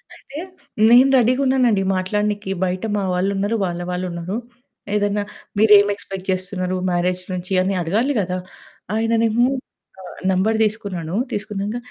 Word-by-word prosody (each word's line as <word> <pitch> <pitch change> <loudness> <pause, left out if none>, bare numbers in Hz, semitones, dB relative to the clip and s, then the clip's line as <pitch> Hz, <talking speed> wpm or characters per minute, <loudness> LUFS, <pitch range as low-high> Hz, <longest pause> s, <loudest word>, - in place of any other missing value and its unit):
అయితే 280 - -12 0.5
నేను 250 +3 +7
రెడీ‌గున్నానండి 255 -3 +3
మాట్లాడినీకి. 205 +1 -1
బయట 180 0 -3
మా 200 - -1
వాళ్ళున్నరు, 200 +4 0
వాళ్ళ 175 -1 -3
వాళ్ళున్నరు. 180 +2 -3 0.6
ఏదన్నా 205 0 +1 0.4
మీరేమి 205 -1 +6
ఎక్స్పెక్ట్ 195 -1 -8
జేస్తున్నారు 185 0 -2
మ్యారేజ్ 180 +1 0
నుంచి 180 +1 -4
అని 190 +2 0
అడగాలి 220 +12 +1
గదా! 185 -1 -1 0.6
ఆయననేమో 225 +1 +2 0.6
ఆ - - -11 0.3
నంబరు 200 +4 +2
తీసుకున్నాను. 195 -6 -4 0.2
తీసుకున్నంక 210 +1 -3
200 Hz, 115 wpm, -21 LUFS, 185-220 Hz, 0.6 s, నేను